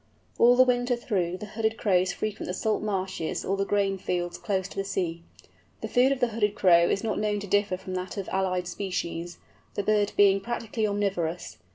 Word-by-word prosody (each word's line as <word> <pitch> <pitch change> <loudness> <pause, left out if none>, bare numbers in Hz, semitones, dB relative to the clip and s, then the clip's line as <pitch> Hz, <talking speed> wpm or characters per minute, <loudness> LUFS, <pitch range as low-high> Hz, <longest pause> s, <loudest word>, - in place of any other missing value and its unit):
All 245 +1 +7
the 255 - +7
winter 245 0 +1
through 185 -7 -1
Hooded 220 +2 -2
Crows 185 -3 +2
frequent 215 +2 -4
the 180 - -3
salt 215 +2 0
marshes 190 -5 -2
or 195 - 0
the 195 0 -1
grain 195 -1 +1
fields 175 -1 -2
close 190 -3 -1
to - - -12
the 195 - -1
sea. 175 -4 -2 0.6
The - - -3
food 255 +2 +3
of 275 - 0
the 245 - +2
Hooded 210 -2 0
Crow 170 -4 +5
is 195 - 0
not 225 - -1
known 210 -1 0
to - - -5
differ 205 -1 +1
from 185 0 -8
that 185 +2 -4
of 195 - -4
allied 185 -1 0
species, 175 -2 -4 0.4
the 205 - -1
bird 210 0 +2
being 195 -1 +6
practically 225 0 -2
omnivorous. 190 -5 -2
195 Hz, 200 wpm, -27 LUFS, 185-215 Hz, 0.6 s, All